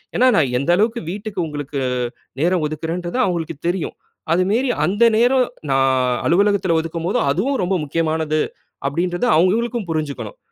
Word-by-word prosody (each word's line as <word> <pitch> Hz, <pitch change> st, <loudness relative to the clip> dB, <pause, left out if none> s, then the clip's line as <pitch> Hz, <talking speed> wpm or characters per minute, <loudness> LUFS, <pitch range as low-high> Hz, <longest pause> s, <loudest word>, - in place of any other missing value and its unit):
ஏன்னா, 255 Hz, +3 st, +4 dB
நா -, -, +5 dB, 0.2 s
எந்த 140 Hz, -, -3 dB
அளவுக்கு 225 Hz, +4 st, +1 dB
வீட்டுக்கு 205 Hz, 0 st, -5 dB
உங்களுக்கு 145 Hz, -2 st, -5 dB, 0.6 s
நேரம் 175 Hz, 0 st, +2 dB
ஒதுக்குறேன்றது 165 Hz, +6 st, -4 dB
அவங்ககளுக்கு 170 Hz, -, -2 dB
தெரியும். 175 Hz, -1 st, -2 dB, 0.4 s
அது 180 Hz, +2 st, +3 dB
மேரி 250 Hz, +5 st, +1 dB, 0.2 s
அந்த 205 Hz, +5 st, +2 dB
நேரம் 250 Hz, +2 st, +4 dB, 0.2 s
நா 135 Hz, -, +3 dB, 0.5 s
அலுவலகத்துல 190 Hz, -1 st, +3 dB
ஒதுக்கும் 165 Hz, +1 st, -5 dB
போது 195 Hz, -, +1 dB
அதுவும் 250 Hz, -, 0 dB
ரொம்ப 185 Hz, +2 st, 0 dB
முக்கியமானது 155 Hz, 0 st, 0 dB, 0.5 s
அப்டின்றது 175 Hz, -, -1 dB
அவங்ககளுக்கும் 215 Hz, +5 st, +1 dB
புரிஞ்சுக்கனும். 140 Hz, -9 st, -4 dB
175 Hz, 135 wpm, -20 LUFS, 160-210 Hz, 0.6 s, நா